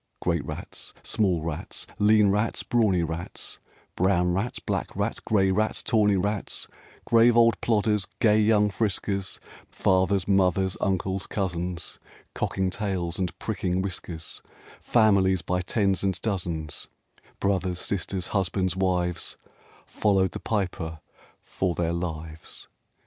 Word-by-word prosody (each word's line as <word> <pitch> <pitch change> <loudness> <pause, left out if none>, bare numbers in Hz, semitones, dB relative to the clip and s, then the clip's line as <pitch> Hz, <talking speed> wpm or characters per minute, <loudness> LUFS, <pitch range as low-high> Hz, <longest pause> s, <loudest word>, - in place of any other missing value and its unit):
Great - - 0
rats, - - -7
small 90 -7 +1
rats, 80 -2 -4
lean 105 0 +5
rats, 105 +3 0
brawny 105 -7 +2
rats, 85 +2 -5 0.4
Brown 90 -1 +2
rats, 100 +7 -1
black - - -3
rats, - - -1
gray 95 -3 +2
rats, 110 +3 0
tawny 105 -2 +3
rats, 100 +2 -1 0.4
Grave 115 0 +5
old 115 -1 +5
plodders, 105 -3 +1
gay 110 -3 +5
young 105 -1 +4
friskers, 100 -2 -1 0.3
Fathers, 95 0 +2
mothers, 95 -1 +2
uncles, 95 0 0
cousins, 90 -3 -3 0.3
Cocking 95 -1 -1
tails 95 -4 -2
and 90 -2 -2
pricking 95 -3 -1
whiskers; 85 -4 -5 0.4
Families 95 -6 +3
by 90 +2 0
tens 95 +1 +1
and 95 -2 0
dozens, 85 -8 -2 0.5
Brothers, 95 -2 0
sisters, 95 -1 -2
husbands, 95 -2 0
wives, 90 -2 0 0.5
Followed 95 -3 +2
the - - -6
Piper 90 -6 -2 0.4
for 90 -3 -2
their 85 -1 0
lives. 80 -2 -5
95 Hz, 120 wpm, -26 LUFS, 90-105 Hz, 0.5 s, lean